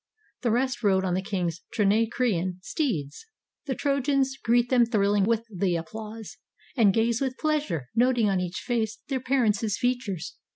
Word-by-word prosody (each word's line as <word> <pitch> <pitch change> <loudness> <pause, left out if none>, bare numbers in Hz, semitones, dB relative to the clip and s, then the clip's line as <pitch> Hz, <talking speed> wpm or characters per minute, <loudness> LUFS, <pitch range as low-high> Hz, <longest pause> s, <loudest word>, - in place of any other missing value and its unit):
The 240 - +1
rest 255 +4 0
rode 190 -3 +2
on 180 - 0
the 185 - 0
king's 180 -4 -3
Trinacrian 210 -3 +1
steeds. 195 - -3 0.4
The 265 - -1
Trojans 275 -1 +1
greet 240 +1 +3
them 250 -2 +5
thrilling 205 -3 +2
with 230 +1 +1
the 180 -1 +1
applause, 215 +6 -7 0.4
And 220 -6 +5
gaze 230 +3 +1
with 260 -1 -1
pleasure, 300 - -1
noting 240 -1 +3
on 195 -2 +1
each 180 -1 -3
face 225 -3 -1
Their 265 -2 0
parents' 225 -6 +1
features. 245 -9 -2
225 Hz, 155 wpm, -26 LUFS, 195-255 Hz, 0.4 s, them